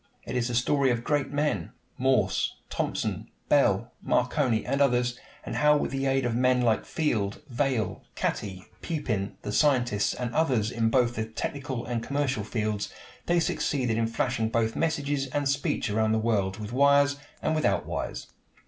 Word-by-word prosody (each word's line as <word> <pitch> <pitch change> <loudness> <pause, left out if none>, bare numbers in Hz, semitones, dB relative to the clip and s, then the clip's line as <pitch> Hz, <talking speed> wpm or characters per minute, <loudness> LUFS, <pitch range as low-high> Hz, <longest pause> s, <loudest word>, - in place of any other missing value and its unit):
It - - -5
is 120 -1 +1
the 120 - -2
story 135 +3 +3
of 120 -1 0
great 145 0 0
men 145 - -1 0.2
Morse, 125 -7 +1 0.2
Thomson, - - -2 0.2
Bell, - - +3
Marconi, 115 -4 +1
and 140 +2 0
others 125 -2 +2 0.3
and - - -4
how, 150 0 +5
with - - -2
the 135 0 -1
aid 135 -1 +1
of 120 - 0
men 125 +1 +3
like 115 -3 +2
Field, 110 -9 -1
Vail, 125 -3 -1
Catty, 95 -3 -3 0.2
Pupin, 115 - -2
the 105 - -3
scientist, 120 -5 +2
and 125 -1 -3
others 125 -9 +2
in 115 -1 +1
both 120 0 +3
the 110 -2 -2
technical 130 +2 -4
and 120 -2 -2
commercial 140 -4 -1
fields, 110 -1 -2 0.4
they 175 0 +3
succeeded 130 -7 0
in 115 0 +1
flashing 115 0 0
both 115 0 0
messages 145 -4 0
and 145 +1 -1
speech 140 +1 0
around 110 +1 +2
the - - +3
world, 105 -4 0
with 105 +1 -6
wires 140 +1 +4 0.3
and - - +1
without 100 - +1
wires. - - -4
125 Hz, 165 wpm, -27 LUFS, 110-140 Hz, 0.4 s, how